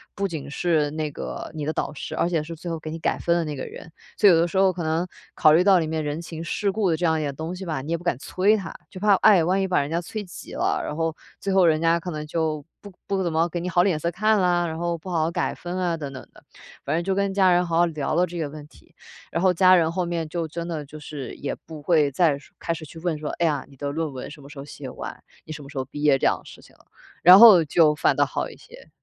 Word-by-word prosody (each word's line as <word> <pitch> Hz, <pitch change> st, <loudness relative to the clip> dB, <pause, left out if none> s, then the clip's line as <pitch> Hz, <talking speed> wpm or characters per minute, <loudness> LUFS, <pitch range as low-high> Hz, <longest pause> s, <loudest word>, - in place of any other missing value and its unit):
不 200 Hz, 0 st, -1 dB
仅 160 Hz, -6 st, -6 dB
是 155 Hz, -2 st, +1 dB
那 155 Hz, 0 st, -3 dB
个 -, -, -6 dB
你 150 Hz, -2 st, -4 dB
的 155 Hz, -, -1 dB
导 -, -, -2 dB
师， -, -, -6 dB
而 170 Hz, -, +1 dB
且 165 Hz, -3 st, 0 dB
是 165 Hz, +2 st, -7 dB
最 170 Hz, +2 st, -7 dB
后 165 Hz, -1 st, -3 dB
给 155 Hz, 0 st, -7 dB
你 165 Hz, -, -6 dB
改 -, -, 0 dB
分 170 Hz, -, +1 dB
的 170 Hz, -, +1 dB
那 150 Hz, -2 st, -4 dB
个 -, -, -5 dB
人， 165 Hz, -, -11 dB, 0.3 s
所 210 Hz, -, +5 dB
以 -, -, +7 dB
有 165 Hz, -, +4 dB
的 170 Hz, -, +2 dB
时 175 Hz, -, -9 dB
候 190 Hz, -1 st, +5 dB
可 180 Hz, -1 st, -5 dB
能 160 Hz, +3 st, -1 dB, 0.3 s
考 155 Hz, -, +5 dB
虑 170 Hz, +3 st, +5 dB
到 190 Hz, -1 st, +5 dB
里 160 Hz, -, -1 dB
面 160 Hz, 0 st, -2 dB
人 150 Hz, +2 st, -3 dB
情 165 Hz, -1 st, -7 dB
世 200 Hz, +4 st, -1 dB
故 200 Hz, -3 st, 0 dB
的 -, -, +2 dB
这 175 Hz, -, -1 dB
样 160 Hz, 0 st, +1 dB
一 -, -, -2 dB
点 140 Hz, -2 st, -3 dB
东 160 Hz, +5 st, -5 dB
西 190 Hz, +1 st, -7 dB
吧， 155 Hz, -6 st, -3 dB
你 145 Hz, -, -9 dB
也 170 Hz, -, +1 dB
不 170 Hz, -, -13 dB
敢 175 Hz, -5 st, +1 dB
催 195 Hz, +8 st, +2 dB
他， 190 Hz, -6 st, -5 dB, 0.2 s
就 185 Hz, -, -9 dB
怕 205 Hz, 0 st, +4 dB
哎， 195 Hz, -4 st, +5 dB
万 185 Hz, +4 st, +1 dB
一 190 Hz, -, 0 dB
把 185 Hz, -, +2 dB
人 140 Hz, -, -4 dB
家 165 Hz, +2 st, 0 dB
催 210 Hz, +5 st, -6 dB
急 180 Hz, -, -11 dB
了， -, -, 0 dB
然 -, -, -4 dB
后 165 Hz, 0 st, -1 dB, 0.2 s
最 200 Hz, -, -3 dB
后 190 Hz, -2 st, +5 dB
人 155 Hz, -1 st, +3 dB
家 165 Hz, 0 st, +3 dB
可 180 Hz, +1 st, -6 dB
能 150 Hz, 0 st, -5 dB
就 155 Hz, -2 st, -2 dB, 0.2 s
不 205 Hz, -, -11 dB, 0.2 s
不 195 Hz, -1 st, 0 dB
怎 170 Hz, -, -1 dB
么 165 Hz, +2 st, +2 dB
给 175 Hz, -, -3 dB
你 175 Hz, -, -4 dB
好 175 Hz, 0 st, +3 dB
脸 180 Hz, -5 st, +1 dB
色 170 Hz, +2 st, -1 dB
看 215 Hz, +3 st, +2 dB
了， 175 Hz, -2 st, +2 dB
然 160 Hz, -1 st, -5 dB
后 170 Hz, 0 st, -1 dB
不 175 Hz, +3 st, -10 dB
好 170 Hz, -3 st, 0 dB
好 160 Hz, -, -1 dB
改 -, -, -2 dB
分 175 Hz, +1 st, -6 dB
啊 175 Hz, -2 st, 0 dB
等 140 Hz, -3 st, -6 dB
等 130 Hz, -, -8 dB
的。 -, -, -18 dB, 0.4 s
反 -, -, 0 dB
正 170 Hz, -, 0 dB
就 190 Hz, +1 st, -1 dB
跟 200 Hz, 0 st, 0 dB
家 190 Hz, -2 st, +4 dB
人 175 Hz, 0 st, +3 dB
好 165 Hz, -1 st, -1 dB
好 175 Hz, -, +5 dB
聊 165 Hz, -, -6 dB
聊 -, -, 0 dB
了 175 Hz, +2 st, +3 dB
这 175 Hz, 0 st, -8 dB
些 160 Hz, -, -2 dB
问 150 Hz, 0 st, -10 dB
题， -, -, -22 dB, 0.4 s
然 170 Hz, -, -1 dB
后 185 Hz, -1 st, +4 dB
家 185 Hz, +1 st, +6 dB
人 165 Hz, -2 st, +2 dB
后 180 Hz, +1 st, -1 dB
面 170 Hz, -2 st, -3 dB
就 165 Hz, 0 st, -3 dB
真 170 Hz, +2 st, -6 dB
的 155 Hz, -3 st, -4 dB
就 155 Hz, +2 st, -11 dB
是 145 Hz, -4 st, -7 dB
也 140 Hz, -, -4 dB
不 155 Hz, -2 st, -9 dB
会 150 Hz, -2 st, +3 dB
再 150 Hz, -1 st, +2 dB
说 140 Hz, -, -18 dB
开 165 Hz, -, -2 dB
始 160 Hz, -1 st, -8 dB
去 160 Hz, -, -13 dB
问 170 Hz, -2 st, -2 dB
说： 150 Hz, -, -4 dB
“哎 170 Hz, -, +2 dB
呀， 150 Hz, -3 st, 0 dB
你 140 Hz, -, -17 dB
的 140 Hz, +1 st, -3 dB
论 155 Hz, 0 st, -2 dB
文 130 Hz, +1 st, -7 dB
什 150 Hz, -, -12 dB
么 140 Hz, -, -13 dB
时 145 Hz, -, -13 dB
候 -, -, -6 dB
写 145 Hz, -, -9 dB
完， -, -, -8 dB, 0.2 s
你 -, -, -9 dB
什 150 Hz, -, -8 dB
么 140 Hz, -, -12 dB
时 150 Hz, -, -10 dB
候 130 Hz, -, 0 dB
毕 145 Hz, +2 st, -8 dB
业？” 150 Hz, -2 st, +5 dB
这 -, -, 0 dB
样 -, -, +3 dB
的 -, -, -20 dB
事 -, -, -13 dB
情 -, -, -19 dB
了。 -, -, -25 dB, 0.4 s
然 180 Hz, +3 st, +10 dB
后 210 Hz, -7 st, +9 dB
就 155 Hz, +1 st, +4 dB
反 -, -, +2 dB
倒 -, -, +3 dB
好 -, -, -3 dB
一 -, -, -12 dB
些。 -, -, -16 dB
165 Hz, 340 characters per minute, -24 LUFS, 155-180 Hz, 0.4 s, 然